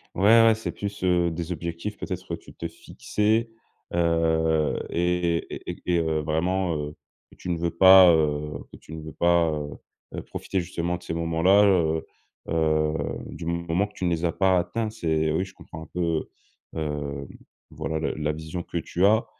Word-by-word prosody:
Ouais, 95 - -1 0.2
ouais, 115 -1 +5
c'est 110 - -4
plus, 100 -2 -6
heu, 90 -1 +3
des 85 +1 -5
objectifs 85 +4 -4
peut-être 95 -1 -5
que 85 - -4
tu - - -8
te 85 - -5
fixais, 110 +6 -1 0.4
heu 80 -2 +2
et 85 0 +1 0.2
et - - -7
et - - -11
et 90 - +1
et - - +3
heu, 80 -1 0
vraiment, 85 +3 0
heu, 75 0 -4 0.3
que - - -19
tu 90 - -7
ne 85 - 0
veux 85 - 0
pas 95 0 +9
heu, 75 -1 0
que - - -11
tu 80 - -13
ne 80 - -7
veux 80 - -8
pas, 85 0 +3
heu 75 -1 -3 0.5
heu, - - -4
profiter, 95 -2 -3
justement, 85 0 -3
de 90 - -17
ces - - -4
moments-là, 85 +5 +4
heu 80 -5 +2 0.4
heu, 80 -1 +1 0.3
du 85 - -8
moment 85 +3 0
que 105 - -13
tu 90 - -4
ne - - +2
les 85 0 -1
as 85 - +2
pas 95 0 +3
atteints. 105 +6 -1
C'est 80 -7 0
oui, 90 +5 0
je 95 - -14
comprends 80 -3 -10
un - - -12
peu, 85 -2 -1 0.5
hem, 75 -3 -4 0.4
voilà, 80 0 -3
la 80 - -1
la 75 0 -1
vision 80 +3 -6
que 85 - -5
tu 90 +3 0
as. 110 +2 +4
85 Hz, 200 wpm, -25 LUFS, 80-90 Hz, 0.5 s, pas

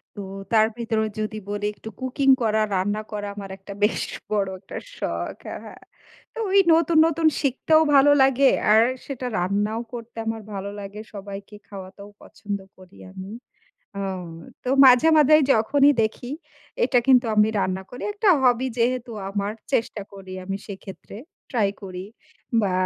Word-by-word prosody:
তো 205 - -6 0.3
তার 220 -1 +5
ভেতরে 230 -2 -1 0.2
যদি 215 0 -3
বলি 205 0 -3
একটু 220 - -10
cooking 265 +1 +2
করা, 220 -1 +2
রান্না 205 +3 0
করা 205 -1 -4
আমার 200 -1 -7
একটা 195 +1 -10
বেশ 210 - +2 0.3
বড় 200 -2 0
একটা 190 - -11 0.2
শখ। - - -3
হ্যাঁ, - - -6
হ্যাঁ। - - -12 0.5
তো - - -14
ওই 395 +1 +5
নতুন, 330 0 +3
নতুন 330 0 +1
শিখতেও 310 +3 +3
ভালো 275 +1 +7
লাগে 270 0 +5 0.2
আর 220 +1 +7 0.2
সেটা 260 -2 -6
রান্নাও 205 +5 0
করতে 235 -1 -9
আমার 225 0 -3
ভালো 195 0 -4
লাগে, 200 +1 -8
সবাইকে 200 +1 -8
খাওয়াতেও 195 +1 -10
পছন্দ 200 0 -6 0.2
করি 185 0 -17 0.2
আমি। 190 +1 -9 0.6
অ্যা 200 0 -3 0.6
তো - - -3 0.2
মাঝে-মাঝেই 305 +3 +6
যখনই 280 +6 +4
দেখি 230 +3 -3 0.5
এটা 250 - +3
কিন্তু 255 -2 +5
আমি 210 +1 +5
রান্না 190 -1 -1
করি। 245 - -9
একটা 415 0 0
hobby 250 0 +3
যেহেতু 245 0 0 0.2
আমার, 200 +1 -2 0.2
চেষ্টা 225 -4 0
করি 195 -1 -10
আমি 195 +1 -3
সেক্ষেত্রে 195 0 -10 0.3
ট্রাই 220 -5 +2
করি 185 -1 -7 0.6
বা 195 -2 0
215 Hz, 150 wpm, -23 LUFS, 200-255 Hz, 0.6 s, ভালো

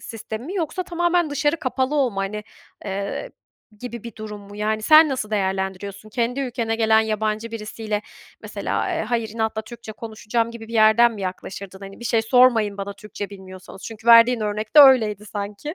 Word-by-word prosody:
sistemi 225 +1 -7
mi? 365 - -6
Yoksa 365 0 -2
tamamen 345 -2 0
dışarı 295 +2 +1
kapalı 260 -1 -1
olma, 250 -9 +1
hani, 210 +2 -4 0.4
eee, 200 - -4 0.5
gibi 240 -2 -7
bir 235 -3 -8
durum 215 -1 -7
mu? 200 0 -13
Yani, 215 +1 -1
sen 310 +6 +7
nasıl 255 -6 -3
değerlendiriyorsun? 195 0 -3
Kendi 240 +4 -1
ülkene 235 -4 -2
gelen 220 -1 +4
yabancı 220 +1 -2
birisiyle, 215 -1 -4 0.4
mesela, - - -3
eee, 340 - -1
hayır 230 0 -1
inatla 220 -1 -2
Türkçe 235 -1 -10
konuşacağım 225 +1 -3
gibi 230 -1 -10
bir - - -10
yerden 230 +1 +5
mi 210 - -8
yaklaşırdın? 190 +1 -6
Hani 195 +2 -11
"Bir - - -8
şey 230 -1 +1
sormayın 225 -3 +4
bana, 200 0 -5
Türkçe 205 0 -8
bilmiyorsanız." 190 -1 -12
Çünkü 225 +1 -9
verdiğin 235 +1 +7
örnekte 215 +6 +3
öyleydi 220 -7 +5
sanki. 205 - -6
220 Hz, 170 wpm, -22 LUFS, 205-245 Hz, 0.5 s, sen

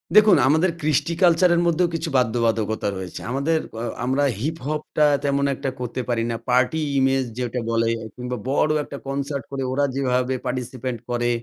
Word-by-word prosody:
দেখুন 210 -5 +7
আমাদের 160 +5 +3
কৃষ্টি 155 +3 +1
কালচারের 175 0 +5
মধ্যেও 170 +1 +2
কিছু 165 0 -2
বাধ্যবাধকতা 115 -3 +1
রয়েছে। 95 -2 -6
আমাদের 155 +5 +1 0.2
আ - - -3 0.2
আমরা 135 +3 +1 0.2
হিপহপটা 150 0 -1 0.2
তেমন 140 0 +1
একটা 135 - -3
করতে 125 +1 -3
পারি 115 -1 +1
না। - - -2
পার্টি 125 +6 +3 0.2
ইমেজ 135 0 +2
যেটা 125 0 -2
বলে 115 0 +2 0.3
কিংবা 125 0 -4
বড় 150 +2 +2
একটা 140 - -8
কনসার্ট 140 0 -3
করে 135 -1 -3
ওরা 140 +2 +2
যেভাবে 125 -1 +1
পার্টিসিপেন্ট 125 -1 -3
করে 120 0 0
135 Hz, 160 wpm, -23 LUFS, 125-155 Hz, 0.3 s, দেখুন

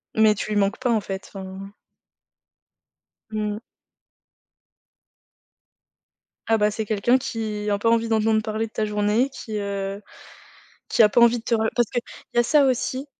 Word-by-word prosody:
Mais 215 -1 +5
tu 215 - -5
lui 210 - +1
manques 200 +4 0
pas 250 -2 0
en 220 -2 +2
fait, 195 -1 -6
enfin. 195 +1 -8 1.6
Mmh. 210 -1 -2 2.9
Ah, 225 - +3
bah, 210 0 +2
c'est 220 0 -3
quelqu'un 220 +4 +2
qui 215 -4 -4
a 200 0 0
pas 230 - +2
envie 230 0 +2
d'entendre 220 0 +2
parler 220 +1 -3
de - - -20
ta 220 - -1
journée, 210 +5 +1
qui, 220 -5 -6
heu, 200 0 -4 0.9
qui 230 - +4
a 210 - +6
pas 240 - +3
envie 235 0 +6
de 225 - -9
te 235 - -1
re 220 0 +2
parce 240 -2 +2
qu'il 240 - -1 0.3
y 240 - +3
a - - +4
ça 285 +3 +4
aussi. 260 +1 -1
220 Hz, 170 wpm, -23 LUFS, 205-230 Hz, 2.9 s, a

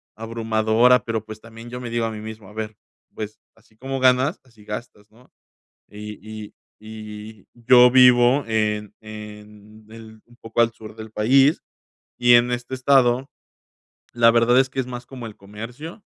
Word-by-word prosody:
abrumadora, 115 +2 +2
pero, 110 -2 -3
pues, 110 0 -10
también 115 +1 -12
yo 125 - -6
me 120 - -6
digo 115 -1 -1
a 115 - -3
mí 110 - -7
mismo: 110 -3 -10
"A 105 - -15
ver, 110 -1 -6 0.4
pues, 105 0 -7 0.2
así 110 -1 -27
como 135 +2 -5
ganas, 130 +6 +2
así 115 -5 -21
gastas", 105 -1 -8
¿no?, 125 +3 -23 0.6
y 105 +1 -9 0.3
y - - -21 0.3
y 110 -1 -10
yo 125 +1 +6
vivo 125 +1 +5
en 105 -2 -1
en 105 0 -12
el 110 -1 -13
un 120 - -22
poco 115 +1 -3
al 115 0 +4
sur 110 -2 -12
del 110 0 -9
país, 135 +8 +3 0.6
y 120 0 +4
en 120 +1 +5
este 125 +2 -4
estado, 130 -1 +2 0.9
la 115 -1 +5
verdad 120 +2 +3
es 130 0 0
que, 135 - -2
es 130 - -4
más 120 -1 -7
como 125 -4 -9
el 105 - -11
comercio. 120 - -10
115 Hz, 170 wpm, -22 LUFS, 110-125 Hz, 0.9 s, yo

